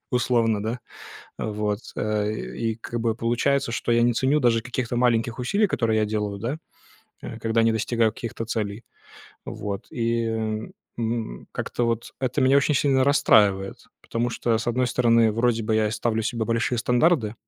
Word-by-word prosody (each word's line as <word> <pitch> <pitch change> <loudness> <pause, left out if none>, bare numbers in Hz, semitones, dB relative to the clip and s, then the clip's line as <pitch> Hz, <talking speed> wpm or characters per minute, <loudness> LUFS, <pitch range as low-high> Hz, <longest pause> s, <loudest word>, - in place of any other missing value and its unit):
условно, 115 -4 +1
да. 115 +3 -3 0.6
Вот. 105 0 -2 0.2
Э, 105 -1 0
и 115 +1 -3
как 120 0 -4
бы 115 -1 0
получается, 120 +3 0
что 120 0 -1
я 120 0 +4
не 120 0 +4
ценю 135 +5 +2
даже 115 -3 +3
каких-то 120 0 -3
маленьких 120 -1 +1
усилий, 200 - +1
которые 115 - +1
я - - +2
делаю, 105 -1 -2
да, 125 +9 -3 0.6
э, 115 - -7
когда 115 0 +1
не 115 - +4
достигаю 110 0 +1
каких-то 115 -1 -5
целей. 110 -1 -3 0.6
Вот. 100 -1 -5
И, 115 -1 0 0.7
м, 115 - -3
как-то 120 - -2
вот 115 -1 -2
это 130 -1 -1
меня 130 +2 +5
очень 140 +1 +2
сильно 135 -1 +3
расстраивает, 105 -9 +3
потому 120 +1 -2
что, 115 -1 0
с 115 - -5
одной 125 +2 +1
стороны, 115 -3 +3
вроде 115 0 +1
бы 110 - 0
и - - +3
я 110 -1 +2
ставлю 110 +1 -1
себе 115 0 -2
большие 115 +1 0
стандарты 125 -1 +2
115 Hz, 170 wpm, -24 LUFS, 110-125 Hz, 0.7 s, меня